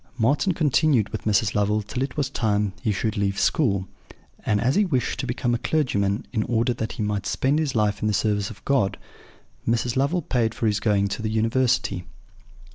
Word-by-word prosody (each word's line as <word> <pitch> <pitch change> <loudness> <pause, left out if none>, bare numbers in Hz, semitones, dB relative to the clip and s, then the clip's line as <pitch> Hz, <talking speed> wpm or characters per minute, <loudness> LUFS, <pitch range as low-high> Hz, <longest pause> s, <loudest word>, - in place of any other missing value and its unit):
"Marten 145 - +2
continued 150 - +2
with - - -6
Mrs. 105 -1 +2
Lovel 105 +1 +1
till 125 +5 -5
it 135 +1 -3
was 145 -2 +1
time 105 -6 0
he 110 - 0
should 105 +2 -2
leave 100 -1 0
school; 100 -10 +1 0.6
and 105 -2 +1
as 125 +4 +2
he 210 - +3
wished 130 - -1
to 130 - -2
become 120 0 -1
a 120 - 0
clergyman, 100 -10 0
in 110 - +1
order 120 +1 +1
that 110 -2 -4
he 110 - -3
might 105 -1 -2
spend 140 +4 +1
his 150 -5 -1
life 105 -2 +1
in 105 - +1
the - - +2
service 105 0 0
of 100 -4 -13
God, 120 -9 +1 0.7
Mrs. 115 +1 +1
Lovel 140 +7 +1
paid 115 -3 0
for - - -2
his 105 -1 +2
going 100 -2 +2
to 100 - -4
the 110 - -2
University. 110 -3 +1
110 Hz, 200 wpm, -24 LUFS, 105-130 Hz, 0.7 s, he